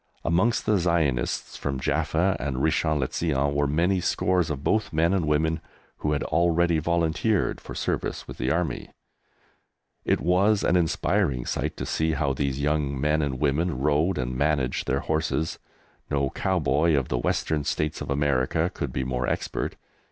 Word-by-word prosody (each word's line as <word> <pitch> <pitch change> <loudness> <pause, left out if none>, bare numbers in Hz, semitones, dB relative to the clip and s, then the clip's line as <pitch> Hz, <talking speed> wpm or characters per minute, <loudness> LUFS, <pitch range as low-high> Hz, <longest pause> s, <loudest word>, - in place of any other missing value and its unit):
Amongst 90 +8 +2
the 105 -2 +3
Zionists 80 -8 0
from 70 -2 -3
Jaffa 80 +6 +1
and 70 0 -2
Richon 80 +2 +1
le 65 -2 0
Zion 70 -3 0
were 70 0 +1
many 85 +6 +2
scores 90 -1 +1
of 70 -2 -4
both 110 +6 +1
men 85 +3 +2
and 90 -5 +1
women 80 +2 +1 0.4
who 75 - -1
had 70 - -1
already 85 0 +2
volunteered 85 +5 0
for - - -9
service - - -2
with - - -9
the 65 - 0
Army. 85 +3 -1 1.1
It - - +1
was 100 +4 +3
an 90 - +2
inspiring 70 -6 +1
sight - - -2
to - - -4
see 80 0 0
how 70 -3 0
these 70 0 -2
young 70 -2 0
men 75 +2 +2
and 70 -4 -2
women 75 +3 +1
rode 75 +6 +1
and 65 0 -2
managed 70 -2 0
their 70 - +1
horses. 80 0 -1 0.5
No 70 -1 0
cowboy 80 -3 +1
of 70 -3 0
the 65 - 0
Western 75 +4 0
States 75 +2 -2
of - - -5
America 70 +4 +1
could 70 - -4
be 65 +1 -2
more 65 -1 -2
expert. - - -2
75 Hz, 165 wpm, -26 LUFS, 70-85 Hz, 1.1 s, the